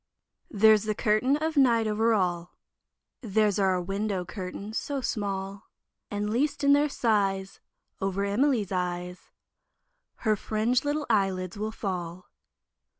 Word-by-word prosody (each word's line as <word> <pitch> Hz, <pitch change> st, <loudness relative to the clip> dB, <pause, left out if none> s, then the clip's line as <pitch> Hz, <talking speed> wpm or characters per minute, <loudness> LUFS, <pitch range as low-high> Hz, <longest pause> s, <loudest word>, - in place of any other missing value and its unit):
There's 215 Hz, 0 st, +5 dB
the 215 Hz, -1 st, -1 dB
curtain 220 Hz, +8 st, +2 dB
of 315 Hz, +1 st, -2 dB
night 235 Hz, -5 st, +4 dB
over 220 Hz, +2 st, +1 dB
all, 175 Hz, -3 st, -2 dB, 0.6 s
There's 210 Hz, -3 st, +1 dB
our 190 Hz, -1 st, +3 dB
own 180 Hz, -1 st, -3 dB
window 195 Hz, -1 st, -2 dB
curtain 195 Hz, +3 st, -7 dB
so 280 Hz, +4 st, -2 dB
small, 200 Hz, -4 st, -4 dB, 0.4 s
And 205 Hz, 0 st, -2 dB
least 285 Hz, +5 st, 0 dB
in 280 Hz, 0 st, +6 dB
their 290 Hz, +1 st, +3 dB
size, 195 Hz, -6 st, 0 dB, 0.4 s
Over 195 Hz, +1 st, -1 dB
Emily's 215 Hz, -1 st, +1 dB
eyes 180 Hz, -1 st, -4 dB, 1.0 s
Her 215 Hz, -1 st, +4 dB
fringed 225 Hz, +6 st, 0 dB
little 295 Hz, +1 st, -1 dB
eyelids 190 Hz, -4 st, 0 dB
will 215 Hz, +1 st, -3 dB
fall. 180 Hz, -4 st, -5 dB
210 Hz, 130 wpm, -27 LUFS, 190-230 Hz, 1.0 s, in